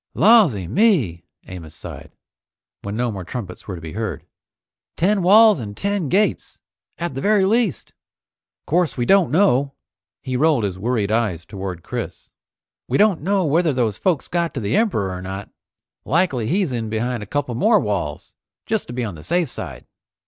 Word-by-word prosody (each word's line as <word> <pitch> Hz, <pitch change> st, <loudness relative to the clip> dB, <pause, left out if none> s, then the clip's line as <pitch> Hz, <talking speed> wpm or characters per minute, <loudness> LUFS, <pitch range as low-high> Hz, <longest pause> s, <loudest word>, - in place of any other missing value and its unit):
"Lawsy 190 Hz, -, +5 dB
me!" 125 Hz, -, +2 dB, 0.2 s
Amos 85 Hz, -4 st, -9 dB
sighed, -, -, -9 dB, 0.7 s
when 100 Hz, +1 st, -5 dB
no 120 Hz, +1 st, 0 dB
more 95 Hz, -3 st, -6 dB
trumpets 95 Hz, -1 st, -7 dB
were 95 Hz, -, -4 dB
to 85 Hz, -, -9 dB
be 80 Hz, 0 st, -7 dB
heard. 110 Hz, +2 st, -4 dB, 0.7 s
"Ten 195 Hz, +4 st, +2 dB
walls 210 Hz, +1 st, +6 dB
and 105 Hz, -3 st, -7 dB
ten 200 Hz, -6 st, -1 dB
gates 205 Hz, +6 st, 0 dB, 0.4 s
at 170 Hz, -3 st, -3 dB
the 135 Hz, -, -4 dB
very 205 Hz, +1 st, +3 dB
least! 210 Hz, -, 0 dB, 0.7 s
'Course 170 Hz, -2 st, +1 dB
we 120 Hz, -, 0 dB
don't 195 Hz, -2 st, +4 dB
know 140 Hz, -4 st, +2 dB, 0.2 s
" -, -, -73 dB
He 130 Hz, -1 st, -3 dB
rolled 145 Hz, -3 st, +3 dB
his 95 Hz, -2 st, -3 dB
worried 110 Hz, -1 st, -1 dB
eyes 105 Hz, -7 st, 0 dB
toward 95 Hz, -4 st, -6 dB
Chris, -, -, -6 dB, 0.6 s
"We -, -, +1 dB
don't 205 Hz, -6 st, +3 dB
know 195 Hz, +2 st, +1 dB
whether 160 Hz, +1 st, +2 dB
those 115 Hz, -5 st, -1 dB
folks 175 Hz, -7 st, 0 dB
got 170 Hz, -3 st, -1 dB
to -, -, -1 dB
the 105 Hz, -2 st, -1 dB
Emperor 190 Hz, -, +1 dB
or 90 Hz, -, -6 dB
not. 95 Hz, +2 st, -7 dB, 0.5 s
Likely 140 Hz, -8 st, +1 dB
he's 180 Hz, -, 0 dB
in 115 Hz, -3 st, -3 dB
behind 115 Hz, +2 st, -2 dB
a 105 Hz, -, -7 dB
couple 140 Hz, 0 st, -2 dB
more 210 Hz, -, +4 dB
walls, 100 Hz, -, -3 dB, 0.3 s
just -, -, -1 dB
to 120 Hz, -, -7 dB
be 125 Hz, 0 st, -2 dB
on 105 Hz, -4 st, -4 dB
the 80 Hz, -2 st, -11 dB
safe 175 Hz, -3 st, 0 dB
side." -, -, -7 dB
125 Hz, 180 wpm, -21 LUFS, -, 0.7 s, walls